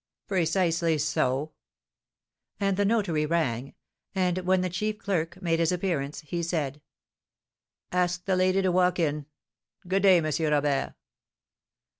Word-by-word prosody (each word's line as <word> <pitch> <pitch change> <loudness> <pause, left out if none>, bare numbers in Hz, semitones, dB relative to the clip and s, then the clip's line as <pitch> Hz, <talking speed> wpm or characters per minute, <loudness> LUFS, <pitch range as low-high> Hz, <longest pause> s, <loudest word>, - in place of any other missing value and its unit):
"Precisely 170 -3 +1
so." 145 0 0 1.1
And 195 -1 +1
the 205 +1 +1
notary 195 -9 +1
rang; 140 -6 -1 0.4
and 185 -1 +1
when 185 0 +2
the 185 - -1
chief 210 +4 -2
clerk 180 -4 -2
made 165 -1 +1
his 165 0 +2
appearance, 170 -6 -2
he 170 +3 -4
said: 150 -4 -2 1.1
"Ask 180 0 0
the 190 -1 +1
lady 185 +1 +2
to 185 - +2
walk 180 0 +2
in. 150 -4 -1 0.6
Good 190 +2 +1
day, 190 -2 +6
M. 160 -2 0 0.2
Robert." 145 -2 +1
175 Hz, 130 wpm, -27 LUFS, 155-185 Hz, 1.1 s, day